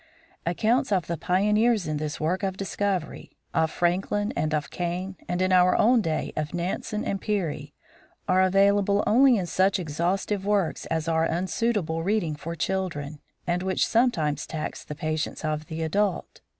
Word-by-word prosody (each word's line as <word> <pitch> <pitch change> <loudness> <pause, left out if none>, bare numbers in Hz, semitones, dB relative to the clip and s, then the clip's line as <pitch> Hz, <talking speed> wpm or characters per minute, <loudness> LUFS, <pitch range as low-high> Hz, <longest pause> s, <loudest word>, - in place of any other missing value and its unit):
Accounts 225 - +1
of 185 -4 +2
the 170 - -2
pioneers 210 +5 +2
in 155 -1 -2
this 150 +1 -4
work 170 +5 0
of 190 -2 -2
discovery, 195 -3 -2 0.2
of 160 0 +2
Franklin 190 +5 0
and 155 - 0
of 150 -2 -2
Kane, 180 +2 -3
and 180 +1 0
in 185 - +1
our 180 0 +5
own 235 +2 +4
day 160 -5 -2
of 155 +2 -3
Nansen 190 +5 -3
and 195 - -2
Peary, 155 -8 -2 0.5
are 185 +1 +4
available 200 +1 +3
only 255 +2 +5
in 185 - -1
such 190 +3 +2
exhaustive 180 +4 -1
works 200 -4 0
as 160 -1 -2
are 165 0 +2
unsuitable 185 -1 -1
reading 175 -4 0
for 165 +3 -6
children, 160 -5 -3 0.3
and 175 0 0
which 190 0 +1
some 240 +2 +3
times 150 - -2
tax 155 -1 -5
the 150 - -7
patience 155 +1 -3
of 155 0 -2
the 160 -1 -4
adult. 195 +3 -1
180 Hz, 165 wpm, -26 LUFS, 160-200 Hz, 0.5 s, our